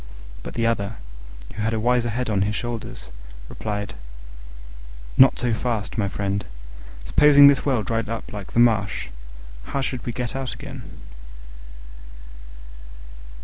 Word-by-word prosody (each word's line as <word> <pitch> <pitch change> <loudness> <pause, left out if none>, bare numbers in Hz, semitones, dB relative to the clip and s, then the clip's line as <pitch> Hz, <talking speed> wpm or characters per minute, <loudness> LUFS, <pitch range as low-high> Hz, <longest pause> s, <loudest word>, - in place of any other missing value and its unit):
But - - -8
the 115 - +1
other, 110 -2 0 0.6
who 105 - -5
had 110 +1 0
a - - 0
wiser 120 +1 +2
head 125 +3 -2
on 105 -3 +1
his 105 +2 0
shoulders, 115 - -5 0.4
replied, 105 -1 -4 1.2
"Not 130 0 +7
so 120 -2 +1
fast, 110 -2 -2
my 105 -4 +1
friend: 100 0 -2 0.6
supposing 145 - +7
this 140 0 +5
well 125 -6 +2
dried 115 0 -2
up 115 +2 -5
like 100 -2 -7
the - - +2
marsh, 110 - +2 0.6
how 140 - -2
should 130 -2 -3
we 120 - -3
get 120 0 -4
out 130 -4 -3
again?" 135 0 -8
115 Hz, 140 wpm, -23 LUFS, 105-125 Hz, 1.2 s, Not